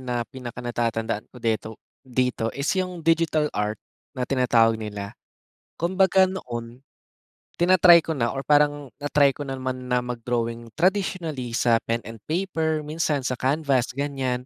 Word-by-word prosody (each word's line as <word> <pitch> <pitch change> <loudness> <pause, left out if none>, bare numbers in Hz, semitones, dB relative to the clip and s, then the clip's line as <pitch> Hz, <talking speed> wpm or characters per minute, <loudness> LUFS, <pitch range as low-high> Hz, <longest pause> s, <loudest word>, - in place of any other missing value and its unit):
na 125 -2 -2
pinakanatatandaan 120 -3 -3
ko - - -17
deto 115 -2 -1 0.3
dito 125 -3 -1
is 140 +2 0
yung 180 -3 -5
digital 160 -2 +2
art 105 +1 -1 0.4
na 125 - -1
tinatawag 115 -4 +3
nila. 105 -1 -6 0.7
Kumbaga 190 +2 +4
noon, 120 -10 -6 0.8
tina-try 175 -1 +6
ko 160 - -1
na 120 -5 0
or 135 0 -5
parang 145 -2 +2
na-try 145 -1 +3
ko 145 - -9
naman 130 -2 -4
na 125 - +3
mag-drawing 115 -1 -3
traditionally 165 - 0
sa 115 -2 +3
pen 115 0 -1
and 115 0 -9
paper 160 -3 -1
minsan 150 -3 -1
sa 130 - 0
canvas 135 0 +1
gan'yan. 135 -3 -2
130 Hz, 135 wpm, -24 LUFS, 120-155 Hz, 0.8 s, tina-try